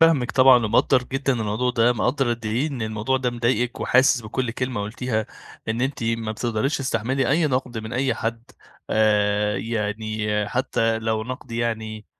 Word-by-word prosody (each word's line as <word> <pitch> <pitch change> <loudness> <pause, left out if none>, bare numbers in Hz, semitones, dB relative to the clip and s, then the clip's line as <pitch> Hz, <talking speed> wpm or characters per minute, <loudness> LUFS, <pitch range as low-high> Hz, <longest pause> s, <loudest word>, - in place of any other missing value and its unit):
فاهمِك 160 -6 +4
طبعًا 130 -3 +6
ومقدِّر 120 +4 +3
جدًا 135 +1 -1
الموضوع 115 +2 -1
ده، 120 0 +3
مقدِّر 125 +3 0
قد 115 -1 -9
إيه 120 +7 0
إن 130 -6 -5
الموضوع 110 +4 -1
ده 130 -1 -1
مضايقِك، 120 +1 -1
وحاسِس 130 0 +4
بكُل 120 +3 -2
كلمة 125 -3 -3
قُلتيها، 110 +1 -2 0.4
إن 115 +2 -1
أنتِ 135 -1 -2
ما 115 -1 -1
بتقدريش 120 +5 -1
تستحمِّلي 130 +1 -1
أي 160 +2 +3
نقد 125 -3 -2
من 110 +1 -7
أي 130 -1 +1
حد. 115 +1 -3 0.5
آآ، 105 -1 +2
يعني، 105 0 -2
حتى 115 -3 0
لو 110 -1 -1
نقد، 130 +1 -7
يعني، 110 -2 -3
115 Hz, 160 wpm, -23 LUFS, 110-130 Hz, 0.5 s, طبعًا